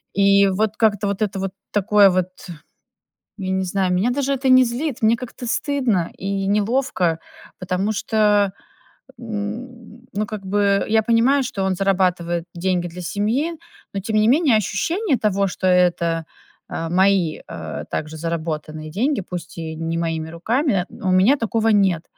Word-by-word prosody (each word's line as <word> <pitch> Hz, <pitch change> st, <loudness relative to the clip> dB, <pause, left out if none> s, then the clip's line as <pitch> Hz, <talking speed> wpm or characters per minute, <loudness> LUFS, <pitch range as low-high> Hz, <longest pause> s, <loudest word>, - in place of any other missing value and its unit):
И 200 Hz, 0 st, +5 dB
вот 215 Hz, +3 st, -1 dB
как-то 205 Hz, -2 st, +2 dB
вот 200 Hz, +1 st, -3 dB
это 200 Hz, -2 st, -1 dB
вот 195 Hz, -1 st, -3 dB, 0.2 s
такое 205 Hz, -1 st, +5 dB
вот, 185 Hz, 0 st, 0 dB, 1.1 s
я 190 Hz, -1 st, -3 dB
не 190 Hz, 0 st, 0 dB
знаю, 185 Hz, 0 st, 0 dB
меня 195 Hz, +7 st, +2 dB
даже 275 Hz, +1 st, 0 dB
это 265 Hz, 0 st, 0 dB
не 255 Hz, 0 st, +7 dB
злит, 250 Hz, +1 st, -3 dB
мне 225 Hz, +2 st, +4 dB
как-то 245 Hz, 0 st, -8 dB
стыдно 235 Hz, -, 0 dB
и 195 Hz, 0 st, -2 dB
неловко, 205 Hz, -5 st, +1 dB, 0.4 s
потому 185 Hz, +3 st, -1 dB
что, 210 Hz, -2 st, +2 dB, 0.7 s
н 230 Hz, +2 st, -7 dB
ну 210 Hz, +1 st, -1 dB
как 210 Hz, -3 st, -7 dB
бы, 200 Hz, 0 st, +2 dB
я 220 Hz, 0 st, +3 dB
понимаю, 240 Hz, +5 st, +3 dB
что 195 Hz, -5 st, -3 dB
он 190 Hz, -1 st, 0 dB
зарабатывает 180 Hz, -3 st, 0 dB
деньги 175 Hz, 0 st, 0 dB
для 180 Hz, +2 st, -8 dB
семьи, 225 Hz, -, -1 dB, 0.4 s
но 200 Hz, -, -2 dB
тем 215 Hz, +3 st, -3 dB
не 215 Hz, +1 st, +4 dB
менее 280 Hz, -1 st, +4 dB
ощущение 290 Hz, -, 0 dB
того, 200 Hz, -2 st, +1 dB
что 185 Hz, 0 st, -2 dB
это, 170 Hz, -2 st, +2 dB, 0.4 s
а, 165 Hz, 0 st, -4 dB
мои, 185 Hz, -2 st, +2 dB
а, 80 Hz, -2 st, -6 dB
также 155 Hz, +1 st, -5 dB
заработанные 155 Hz, -1 st, -4 dB
деньги, 250 Hz, -, 0 dB
пусть 180 Hz, -1 st, -8 dB
и 160 Hz, -1 st, -5 dB
не 165 Hz, +1 st, -3 dB
моими 165 Hz, -1 st, -2 dB
руками, 200 Hz, -, 0 dB
у 185 Hz, -, -3 dB
меня 195 Hz, +10 st, +5 dB
такого 225 Hz, -1 st, 0 dB
нет. 190 Hz, -6 st, +3 dB
200 Hz, 155 wpm, -21 LUFS, 180-225 Hz, 1.1 s, не